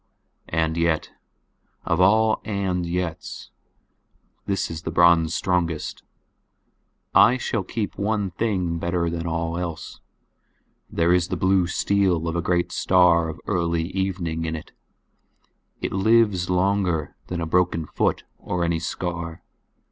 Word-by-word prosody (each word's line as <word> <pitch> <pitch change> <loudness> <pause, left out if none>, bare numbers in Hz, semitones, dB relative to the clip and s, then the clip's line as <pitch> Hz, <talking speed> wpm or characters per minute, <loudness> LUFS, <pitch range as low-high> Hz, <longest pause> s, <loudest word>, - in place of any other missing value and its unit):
And 80 0 0
yet—of 85 +1 -3
all 110 +3 +4
"and 95 -4 -1
yets" 85 -1 -4 1.0
this 95 -3 -1
is 80 -1 -5
the - - -4
bronze 85 -1 +4
strongest—I 90 +7 -1
shall 115 -4 -2
keep 100 +2 -4
one 100 -2 0
thing 90 -4 -1
better 85 0 -1
than 85 0 -3
all 85 +1 -2
else; 85 -3 -6 0.9
there 85 +1 +2
is 90 -1 +2
the - - -3
blue 95 -1 +2
steel 90 -3 +1
of 85 - -2
a 85 - 0
great 85 0 0
star 85 -3 +3
of 80 0 -7
early 85 -3 0
evening 90 -4 -2
in 80 0 -2
it; 80 - -9 1.1
it - - -2
lives 100 -2 +3
longer 90 -4 +1
than 90 - -3
a 85 - -2
broken 85 -1 +1
foot - - -1 0.2
or 90 -1 -2
any 85 -1 0
scar. 85 0 -4
85 Hz, 125 wpm, -23 LUFS, 85-95 Hz, 1.1 s, all